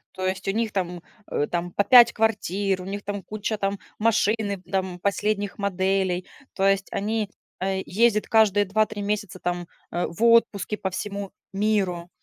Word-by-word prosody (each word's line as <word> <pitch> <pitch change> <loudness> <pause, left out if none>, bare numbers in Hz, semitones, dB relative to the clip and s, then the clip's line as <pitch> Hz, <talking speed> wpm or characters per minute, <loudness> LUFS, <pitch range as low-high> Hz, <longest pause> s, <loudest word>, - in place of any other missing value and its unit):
То 185 - -2
есть, 185 0 -2
у - - +4
них 225 0 -1
там, 180 -3 -3 0.3
э, 145 - 0
там 175 0 -2
по 200 - +1
5 240 +1 +8
квартир, 200 -3 0
у - - -8
них 200 +2 -5
там 205 -1 -4
куча 215 +3 -3
там 195 0 -1 0.2
машины, 215 -3 +1
там 190 -2 -1
последних 200 +1 -1
моделей. 190 -2 0 0.3
То 195 - 0
есть, 195 0 +2
они, 215 0 -1 0.3
а, 190 - -1 0.2
ездят 215 +2 +2
каждые 210 -3 +4
2-3 215 +1 0
месяца 205 -2 -2
там, 175 -1 -3 0.2
э, 175 - -1
в 170 +6 -7
отпуске 220 -4 +3
по 190 - -3
всему 200 +1 -5 0.2
миру. 195 -4 0
200 Hz, 165 wpm, -25 LUFS, 185-215 Hz, 0.3 s, 5